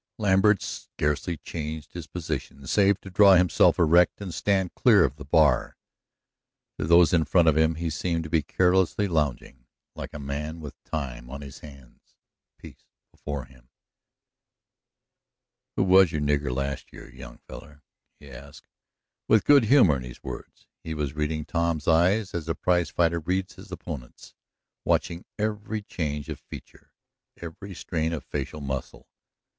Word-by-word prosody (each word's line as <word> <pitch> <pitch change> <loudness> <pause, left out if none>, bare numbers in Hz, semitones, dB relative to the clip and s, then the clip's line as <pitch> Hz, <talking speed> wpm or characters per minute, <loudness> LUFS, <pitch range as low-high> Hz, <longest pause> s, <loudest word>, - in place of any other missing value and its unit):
Lambert 100 -1 +3
scarcely 75 +3 -3
changed 75 0 -7
his 85 -3 -7
position, 75 -4 -6
save 100 +6 +3
to 95 - -11
draw 100 +1 +7
himself 90 -1 +4
erect 85 +2 +4
and 95 -4 -6
stand 95 +4 0
clear 105 -7 +5
of 70 0 -1
the 75 - -9
bar. 75 -3 +2 1.0
To - - -1
those 85 +3 +5
in 85 -2 +4
front 85 0 +3
of 80 - +5
him 80 +1 +2
he 85 0 -3
seemed 85 +2 -2
to 80 - -8
be 80 - +3
carelessly 95 +5 +1
lounging, 70 -6 -2 0.3
like - - -7
a - - -8
man 75 +3 -5
with 75 -3 -11
time 60 -6 -5
on 70 +2 -7
his 70 -1 -10
hands, 70 -4 -16 0.4
peace - - -14 0.3
before 70 -3 -6
him. 65 -1 -22 2.1
"Who - - +2
was 95 -2 +5
your 75 - -2
nigger 75 -1 0
last 70 +2 -4
year, - - -12
young 65 -2 -11
feller?" 75 +1 -13 0.4
he 70 -2 -14
asked, 70 +3 -13 0.6
with 110 - +4
good 140 -5 +6
humor 105 - +5
in - - -7
his 60 0 -11
words. - - -9 0.2
He 80 -1 -5
was 75 -3 -3
reading 75 0 -2
Tom's 85 -3 -1
eyes 90 +6 +3
as 85 -2 -4
a 80 - 0
prize 90 -3 +1
fighter 85 +1 +1
reads 90 +3 -2
his - - -14
opponent's, 65 -6 -9 0.5
watching 85 +1 -1
every 105 0 -3
change 75 -7 -4
of - - -6
feature, - - -13 0.5
every 90 +3 -9
strain 80 -1 -2
of 80 - -4
facial 75 +1 -5
muscle. 70 -2 -6
80 Hz, 155 wpm, -26 LUFS, 70-90 Hz, 2.1 s, draw